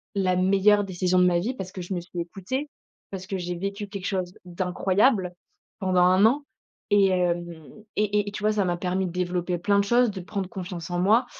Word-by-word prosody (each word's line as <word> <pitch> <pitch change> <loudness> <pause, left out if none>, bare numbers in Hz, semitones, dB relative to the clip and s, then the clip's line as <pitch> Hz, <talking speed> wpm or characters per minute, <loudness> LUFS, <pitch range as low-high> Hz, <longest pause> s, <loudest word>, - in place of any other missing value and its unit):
la 185 -2 +1
meilleure 195 +2 +4
décision 185 0 +1
de 180 - +5
ma 175 -1 +3
vie 225 +9 -2
parce 185 -5 -6
que 185 - -6
je 180 +2 -5
me 180 - -1
suis 175 0 -6
écoutée, 200 - -4 0.4
parce 190 -1 -6
que 195 - -3
j'ai 180 0 -4
vécu 200 +3 -4
quelque 200 -2 -6
chose 185 -2 -2
d'incroyable 185 +3 +1 0.5
pendant 185 -2 +2
1 185 +3 +5
an 280 +6 +2 0.5
et 200 -1 +5
hem 175 -2 +1 0.5
et 210 -1 +1
et - - -11
tu 210 0 -7
vois, 215 0 +3
ça 210 -2 +1
m'a 175 -2 -1
permis 185 +1 -1
de 175 - -4
développer 180 0 -1
plein 200 +4 +2
de - - +3
choses, 240 +2 +3
de 190 -2 -7
prendre 190 +1 -4
confiance 180 -2 -6
en 175 - -1
moi 220 +7 +4
185 Hz, 215 wpm, -25 LUFS, 180-205 Hz, 0.5 s, de